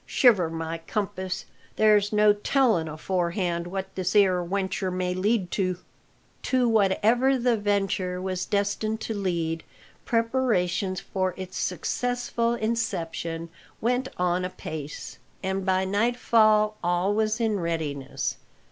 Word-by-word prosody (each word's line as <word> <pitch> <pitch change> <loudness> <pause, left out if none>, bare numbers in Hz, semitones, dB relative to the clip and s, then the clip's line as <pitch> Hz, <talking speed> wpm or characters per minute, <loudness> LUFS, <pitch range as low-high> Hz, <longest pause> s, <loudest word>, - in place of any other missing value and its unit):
Shiver 205 -10 +4
my 165 0 -4
compass, 190 -3 -3 0.3
there's 210 -1 +4
no 210 0 +5
telling 210 -5 +2
aforehand 175 +1 -1
what 190 +1 -5
this 185 +1 -2
'ere 185 -3 +4
wenture 190 +1 -1
may 180 0 -1
lead 190 0 0
to." 185 -3 0 0.6
To 255 -2 +2
whatever 225 +5 +3
the 245 -1 +2
venture 195 -3 0
was 185 0 -3
destined 205 +2 0
to 225 - -3
lead, 170 -5 -2 0.4
preparations 210 -7 +1
for 185 -2 -2
its 185 -1 -7
successful 235 +5 -1
inception 170 -7 -2 0.3
went 250 +3 0
on 180 0 +1
apace, 155 -4 -6 0.2
and 190 0 -1
by 190 0 +1
nightfall 215 0 +3
all 175 +3 +1
was 215 +1 +1
in 220 -3 +1
readiness. 160 -5 -3
195 Hz, 120 wpm, -26 LUFS, 180-220 Hz, 0.6 s, no